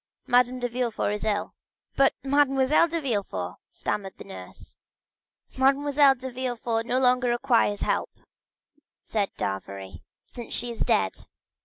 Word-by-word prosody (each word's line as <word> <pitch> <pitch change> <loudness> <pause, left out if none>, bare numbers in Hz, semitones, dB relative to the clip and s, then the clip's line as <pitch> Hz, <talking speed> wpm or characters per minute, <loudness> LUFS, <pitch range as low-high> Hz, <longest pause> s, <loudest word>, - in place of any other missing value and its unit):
"Madame 250 +1 +3
de 245 - -1
Villefort 240 -3 -1
is 210 - -4
ill." 210 -1 -1 0.4
50087m - - -35
"But 275 - +5
Mademoiselle 275 +2 +3
de 335 0 -2
Villefort——" 195 - -3
stammered 195 -2 -4
the - - -9
nurse. 90 -1 -10 0.8
"Mademoiselle 280 +1 +4
de 260 0 -7
Villefort 240 -2 -2
no 250 - +1
longer 250 -1 +3
requires 240 -4 +2
help," - - 0 0.9
said 205 -3 -1
d'Avrigny, 95 0 -5 0.2
"since 240 -2 -9
she 240 0 -1
is 230 - -9
dead." - - 0
245 Hz, 135 wpm, -26 LUFS, 210-265 Hz, 0.9 s, But